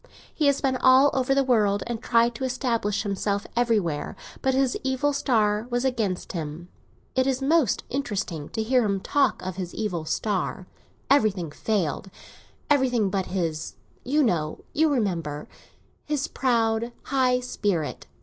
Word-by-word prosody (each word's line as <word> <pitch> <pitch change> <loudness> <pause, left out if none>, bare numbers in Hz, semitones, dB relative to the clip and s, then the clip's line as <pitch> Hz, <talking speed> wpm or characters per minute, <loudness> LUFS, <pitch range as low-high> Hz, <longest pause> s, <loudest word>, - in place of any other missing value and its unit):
He 300 - +1
has 280 -1 +2
been 265 -2 +1
all 260 +3 +6
over 265 +1 +1
the 275 - +3
world, 210 -6 +2
and 235 -1 -4
tried 235 0 +3
to 225 - -6
establish 240 -6 -1
himself 200 0 -1
everywhere; 210 -11 0 0.3
but 265 0 +1
his 265 -2 +2
evil 265 +2 +1
star 220 -5 +1
was 245 +1 0
against 220 -8 -1
him. 165 +1 -6 0.5
It 260 +1 +2
is 265 -1 +1
most 280 -3 +2
interesting 195 - -3
to 220 - -2
hear 250 +2 +3
him 200 -2 0
talk 270 +4 +1
of 185 -1 -5
his 180 -2 -5
evil 180 -7 -2
star. 190 0 -2 0.5
Everything 200 - +2
failed; 190 -1 -1 0.6
everything 250 -8 +2
but 190 -1 -1
his—you 180 - -2
know, 160 - -1
you 315 +1 +3
remember—his 200 - -4
proud, 230 -2 +1
high 255 -2 +2
spirit. 205 -10 -2
225 Hz, 140 wpm, -25 LUFS, 190-260 Hz, 0.6 s, all